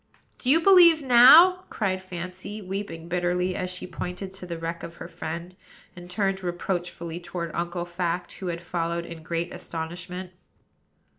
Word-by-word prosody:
"Do 250 - -2
you 310 +4 +6
believe 340 -4 +7
now?" 300 +9 +8
cried 190 -3 -1
Fancy, 185 +3 -7
weeping 190 -4 -6
bitterly, 180 +1 0
as 185 - -3
she 180 0 -6
pointed 180 +2 -6
to 190 -1 -8
the 170 -1 -4
wreck 165 +1 -4
of 170 0 -8
her - - -8
friend, 170 +3 -6 0.4
and 175 0 -11
turned 195 +1 0
reproachfully 175 -1 -3
toward 175 -1 -5
Uncle 175 0 -3
Fact, 175 0 -3
who 190 - -6
had 170 0 -4
followed 170 0 -2
in 165 -1 -9
great 170 +2 -3
astonishment. 175 +2 -6
180 Hz, 155 wpm, -26 LUFS, 170-190 Hz, 0.4 s, now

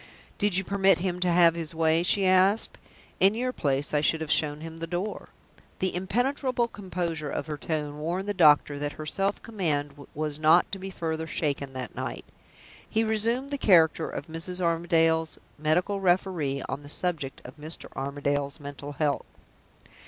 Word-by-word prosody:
"Did 205 -3 +2
you 190 - +2
permit 195 0 +3
him 180 0 -2
to 180 -1 +2
have 170 -1 +6
his 165 -1 -5
way?" 160 0 +3
she 195 +2 +2
asked. 185 +3 +3 0.4
"In 195 +3 +5
your 255 +2 -1
place, 140 - 0
I 150 - +3
should 160 +2 +2
have 160 -1 -4
shown 150 -1 +2
him 165 0 -8
the 165 0 -5
door." 180 +5 -4 0.5
The 190 - -1
impenetrable 245 +6 0
composure 175 -8 -4
of 140 - -3
her 150 -1 -4
tone 150 -1 -3
warned 175 +6 -2
the 205 - 0
doctor 150 -5 +5
that 145 0 -3
her 155 - -7
self 195 +5 -1
command 145 -9 -3
was 150 0 -2
not 160 +3 +5
to 195 - -4
be 190 +1 -6
further 160 -3 -3
shaken 140 -4 -2
that 130 -2 -6
night. - - -5 0.6
He 220 - +1
resumed 230 +5 0
the 285 - -2
character 165 -6 +4
of - - -5
Mrs. 165 +3 -3
Armadale's 165 -2 +2 0.2
medical 180 +6 +1
referee 175 -7 +1
on 140 - -4
the 145 - -11
subject 150 -5 -2
of 130 +5 -11
Mr. 155 +3 -6
Armadale's 140 +1 -2
mental 145 0 -7
health. 145 0 -1
165 Hz, 175 wpm, -27 LUFS, 150-190 Hz, 0.6 s, have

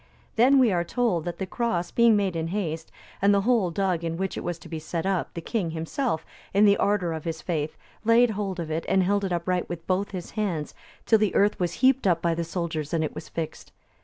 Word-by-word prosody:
Then, 255 +5 +5
we 250 -5 +5
are 175 -2 +1
told, 200 -5 0
that 175 - -4
the 190 - -3
cross 180 -4 -2
being 235 -2 +5
made 195 -4 0
in 165 0 -1
haste, 165 -4 -3 0.3
and 200 +1 +5
the 200 -1 +4
hole 225 -4 +2
dug 180 -1 0
in 165 0 -2
which 190 +1 -2
it - - -5
was 175 -2 -3
to 165 - -13
be 160 -1 -5
set 165 +2 -4
up, 195 -2 0
the 170 - -4
king 190 -1 -2
himself, 165 - -2 0.3
in 205 +1 +6
the 200 -1 +6
ardour 195 -5 +1
of 160 -1 -5
his 160 -1 -4
faith, 155 -3 -2 0.3
laid 230 +1 +5
hold 195 -3 -3
of 160 -2 -4
it 160 +1 -1
and 190 -1 +4
held 200 +2 +1
it 190 - -2
upright 175 +1 -1
with 170 -1 -6
both 190 +2 0
his 180 -3 -6
hands, 185 -8 -2 0.3
till 220 - +5
the 215 -2 +1
earth 205 +1 +3
was 175 -2 0
heaped 265 -4 +4
up 170 -3 +3
by 170 0 +1
the 170 +1 -2
soldiers 165 -2 -3
and 160 - +1
it 155 - -3
was - - -8
fixed. 165 -2 -6
180 Hz, 245 wpm, -26 LUFS, 165-205 Hz, 0.3 s, in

